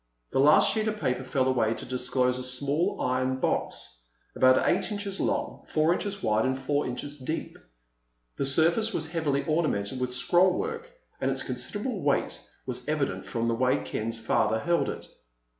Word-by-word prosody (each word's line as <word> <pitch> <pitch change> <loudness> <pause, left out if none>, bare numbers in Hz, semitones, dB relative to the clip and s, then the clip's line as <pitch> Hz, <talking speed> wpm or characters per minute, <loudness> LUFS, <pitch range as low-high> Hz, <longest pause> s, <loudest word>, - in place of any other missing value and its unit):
The - - +1
last 145 +3 +6
sheet 220 -1 0
of 215 -1 -2
paper 125 -7 -1
fell 130 0 0
away 115 -4 +2
to - - -7
disclose 125 0 +1
a - - -4
small 140 +8 0
iron 130 +1 0
box, - - -2 0.4
about 130 0 +4
eight - - +1
inches 205 -1 -3
long, - - -2
four 155 +2 +2
inches 200 +2 -4
wide, 110 0 +2
and 130 0 0
four 145 +2 -1
inches 145 +4 -5
deep. 155 +5 -5 0.8
The 140 - -1
surface 170 +11 +2
was 160 0 -2
heavily 145 -5 0
ornamented 130 -8 0
with 125 0 -1
scrollwork, 190 - +1 0.3
and - - +1
its - - -2
considerable 210 0 -4
weight 145 -1 0 0.2
was - - -4
evident - - -1
from 115 0 -2
the 115 - +1
way 125 - +2
Ken's 110 +11 -4
father 110 0 +1
held 170 +9 +1
it. - - -6
135 Hz, 170 wpm, -27 LUFS, 125-170 Hz, 0.8 s, last